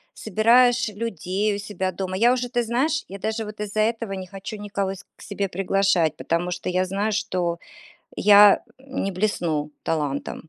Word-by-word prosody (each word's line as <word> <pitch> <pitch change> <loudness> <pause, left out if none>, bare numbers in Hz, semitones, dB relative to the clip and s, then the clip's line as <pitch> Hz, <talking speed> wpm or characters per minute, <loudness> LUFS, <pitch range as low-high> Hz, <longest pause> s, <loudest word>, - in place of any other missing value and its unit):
собираешь 235 +4 +3
людей 205 -1 -2
у - - -5
себя 200 -3 -3
дома. 185 +1 -4
Я 235 +4 +5
уже, 250 -1 -2
ты 240 -1 0
знаешь, 270 +7 0
я 195 +1 -8
даже 220 +2 -2
вот 210 0 -9
из-за 210 +1 -1
этого 225 -1 -1
не 190 -1 -6
хочу 195 +3 -7
никого 200 -2 -3
с 195 - -13
к - - -18
себе 200 -1 -3
приглашать, 185 -4 +1
потому 170 +2 -1
что 180 - -4
я 185 +1 +1
знаю, 200 +3 -1
что 180 -5 -1 0.6
я 205 0 +7 0.2
не 265 -7 -4
блесну 170 -6 -1
талантом. 150 0 -3
200 Hz, 170 wpm, -23 LUFS, 185-220 Hz, 0.6 s, я